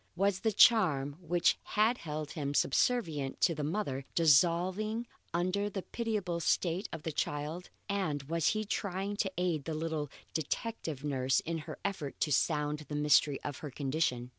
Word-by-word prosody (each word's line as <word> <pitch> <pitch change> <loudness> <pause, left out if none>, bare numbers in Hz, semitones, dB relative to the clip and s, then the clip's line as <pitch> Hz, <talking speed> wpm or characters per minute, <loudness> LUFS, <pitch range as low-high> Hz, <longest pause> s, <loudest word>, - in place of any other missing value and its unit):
Was 195 +1 +1
the 220 - +1
charm 155 - +5
which 175 0 +2
had 220 +3 +1
held 150 -1 -5
him 145 -2 -3
subservient 150 - +1
to 170 - +4
the 150 -1 -4
mother, 145 -5 -2
dissolving 180 - +3 0.3
under 185 +4 0
the 195 -2 -5
pitiable 210 -7 -2
state 170 +3 0
of 155 - -6
the 160 - -2
child, 150 +4 -3 0.2
and 185 -9 -1
was 165 +3 0
he 215 0 +1
trying 200 0 -2
to 195 -2 0
aid 175 -5 0
the 160 - -3
little 155 -2 -2 0.2
detective 160 - -3
nurse 135 -2 +1
in 165 0 -3
her 155 - -6
effort 180 -8 -3
to 150 - +1
sound 150 +1 +1
the 150 - -3
mystery 150 -1 +4
of 145 -2 -5
her 150 - -6
condition? 130 -3 -1
165 Hz, 165 wpm, -32 LUFS, 145-195 Hz, 0.3 s, charm